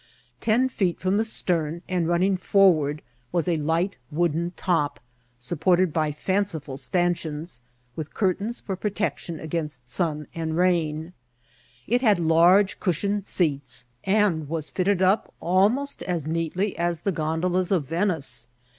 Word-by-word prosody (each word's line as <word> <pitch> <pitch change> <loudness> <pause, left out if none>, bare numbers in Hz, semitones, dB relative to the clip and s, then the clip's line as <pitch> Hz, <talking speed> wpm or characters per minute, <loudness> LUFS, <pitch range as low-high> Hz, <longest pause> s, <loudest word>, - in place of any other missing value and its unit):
Ten 235 +4 +2
feet 190 -9 -1
bom 185 +2 +1
the 220 - +3
stern, 170 -6 -1
and 180 -3 0
running 180 +3 +2
forward, 170 -6 +3 0.3
was 175 -1 0
a 170 -2 +2
light 165 +6 0
wooden 170 +1 0
top, 165 -6 0 0.4
supported 175 +6 +2
by 155 -2 +1
fanciful 160 -3 -2
stancheons, 165 -2 -1 0.3
with 155 -1 -5
curtains 205 +3 -1
for 195 - -4
protection 195 -4 -3
against 150 -6 -4
sun 150 +1 0
and 160 -1 -3
rain; 170 -2 +1 0.7
it 245 +2 +1
had 210 -7 +4
large 175 +4 +4
cush 180 -3 -1
ioned 200 0 -1
seats, 140 -9 -1 0.2
and 190 -7 +1
was 160 -1 -4
fitted 190 0 +1
up 190 +4 +2
almost 210 +11 +1
as 175 -5 -2
neatly 165 +5 -1
as 170 -2 -1
the 195 - 0
gondolas 175 +3 0
of 175 -7 +2
Venice. 160 - 0
175 Hz, 135 wpm, -25 LUFS, 155-190 Hz, 0.7 s, had